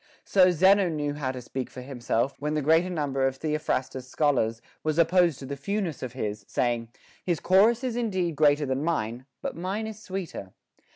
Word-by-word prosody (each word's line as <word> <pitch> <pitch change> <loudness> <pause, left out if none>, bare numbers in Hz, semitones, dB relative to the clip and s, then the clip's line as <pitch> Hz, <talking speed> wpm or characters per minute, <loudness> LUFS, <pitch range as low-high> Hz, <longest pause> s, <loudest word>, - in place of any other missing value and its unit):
So 185 -2 +5
Zeno 190 +2 +4
knew 150 -2 -2
how 145 -3 -2
to 130 -1 -7
speak 130 +1 -5
for 125 - -9
himself, 125 0 -1
when 150 +2 -2
the 150 - +1
great 165 +5 +3
number 140 -5 0
of 135 - -2
Theophrastus's 135 -4 -2
scholars 125 -7 +1 0.2
was 155 0 0
opposed 170 -2 +4
to 135 - -8
the 140 +1 -4
fewness 180 +2 -3
of 125 -2 -5
his, 105 -5 -4
saying, 120 -2 -1 0.3
His 175 -4 0
chorus 220 +7 +4
is 250 -3 -2
indeed 190 -9 -1
greater 145 0 +4
than 130 +1 -1
mine, 125 -6 -2 0.2
but - - -3
mine 190 +6 -3
is 220 -1 -7
sweeter. 185 - -6
150 Hz, 185 wpm, -27 LUFS, 130-180 Hz, 0.3 s, So